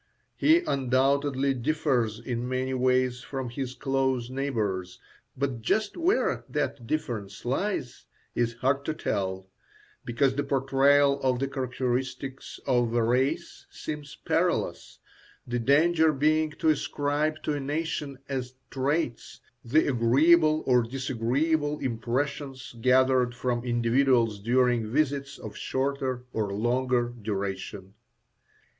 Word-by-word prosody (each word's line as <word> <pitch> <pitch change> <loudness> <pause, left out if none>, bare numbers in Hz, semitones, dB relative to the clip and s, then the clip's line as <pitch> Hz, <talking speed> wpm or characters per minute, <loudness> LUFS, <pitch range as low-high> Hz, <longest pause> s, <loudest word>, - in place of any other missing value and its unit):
He 325 +3 +4
undoubtedly 135 - +1
differs 125 -4 0
in 120 +1 -4
many 130 +1 -1
ways 130 -1 +1
from 130 -2 -5
his 130 +1 -5
close 130 -2 0
neighbours, 105 -10 -2 0.4
but 130 -3 -2
just 210 - 0
where 355 +6 +1
that 120 -4 -2
difference 115 -11 -4
lies 130 - -2 0.3
is 115 -1 0
hard 135 +3 0
to 155 - -2
tell, 95 -7 -2 0.6
because 130 +3 +1
the 145 +2 -1
portrayal 140 +1 +3
of 130 -1 +2
the 135 +2 -1
characteristics 130 0 -3
of 120 -3 +1
a 120 - +3
race 135 +8 0
seems 150 -2 -7
perilous, - - 0 0.5
the 120 0 -2
danger 160 +6 +4
being 155 +2 +2
to 160 - 0
ascribe 150 +1 0
to 150 - 0
a 145 - -2
nation, 145 -1 -3
as 130 -2 -4 0.2
traits, 135 -2 -2 0.2
the 145 +7 +3
agreeable 155 +6 +4
or 125 -2 +4
disagreeable 135 +5 0
impressions 130 +2 -3
gathered 130 0 +3
from 120 -1 -1
individuals 120 -2 +2
during 120 0 +2
visits 140 0 0
of - - -9
shorter 130 -2 -2
or 105 -3 -1
longer 120 +3 0
duration. 100 -1 -4
130 Hz, 115 wpm, -27 LUFS, 120-140 Hz, 0.6 s, He